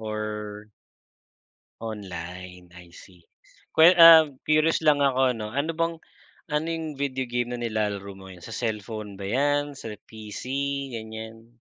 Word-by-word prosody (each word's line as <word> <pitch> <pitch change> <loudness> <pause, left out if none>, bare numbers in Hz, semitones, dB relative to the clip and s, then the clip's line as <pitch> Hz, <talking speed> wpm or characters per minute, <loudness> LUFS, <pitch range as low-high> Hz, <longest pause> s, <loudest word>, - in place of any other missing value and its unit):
Or? 105 -1 -5 1.1
Online 90 -4 -8
I 90 -1 -14
see. 90 0 -16 0.5
Kwan 160 +3 +7
um, 165 -1 +10 0.2
curious 155 +2 +2
lang 150 -2 +4
ako 135 -2 +3
ano, 105 0 -6
ano 145 +5 -1
bang 165 0 0 0.6
ano 150 +1 0
yung 160 -3 -4
video 130 -2 -2
game 120 0 -2
na 120 - -5
nilalaro 105 -4 -3
mo 95 - -13
ngayon 95 -2 -12
sa - - -8
cellphone 110 -2 -4
ba 100 - -5
yan, 145 +3 0
sa 110 -5 -7
PC 105 0 -10 0.5
ganyan? 115 0 -9
110 Hz, 140 wpm, -25 LUFS, 105-140 Hz, 1.1 s, um